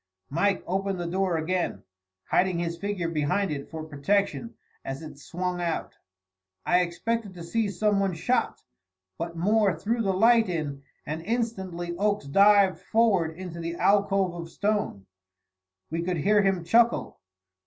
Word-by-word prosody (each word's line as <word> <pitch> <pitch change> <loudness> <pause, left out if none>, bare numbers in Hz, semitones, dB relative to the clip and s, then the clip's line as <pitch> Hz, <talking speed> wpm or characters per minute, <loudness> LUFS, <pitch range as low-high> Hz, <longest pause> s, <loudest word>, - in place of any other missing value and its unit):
Mike 190 +6 +1
opened 195 0 -1
the 175 - -3
door 185 0 0
again, 175 +3 -2 0.5
hiding 185 -1 +3
his 170 0 -2
figure 195 -1 -3
behind 165 +4 0
it 140 -2 -5
for 160 -1 -6
protection 200 +9 -1 0.3
as 135 +3 -5
it 155 -2 -10
swung 180 +3 -3
out. 170 -2 -3 0.7
I 180 - +4
expected 200 +4 -2
to 170 - -8
see 210 +5 0
some 205 0 +1
one 195 -3 0
shot, 245 +10 0 0.6
but 170 0 -4
Moore 200 0 +2
threw 225 +7 -1
the 195 -3 +1
light 225 +2 +4
in, 150 -5 -3 0.2
and 155 +2 -4
instantly 190 -5 -3
Oakes 205 -4 0
dived 200 +5 +5
forward 195 -8 +2
into 180 -2 -7
the 170 0 -4
alcove 195 -1 +2
of 170 -1 -7
stone. 205 - -1 0.9
We 165 +1 -1
could 175 0 -1
hear 205 +7 +3
him 195 -3 +1
chuckle. 230 +7 +2
185 Hz, 150 wpm, -27 LUFS, 170-205 Hz, 0.9 s, dived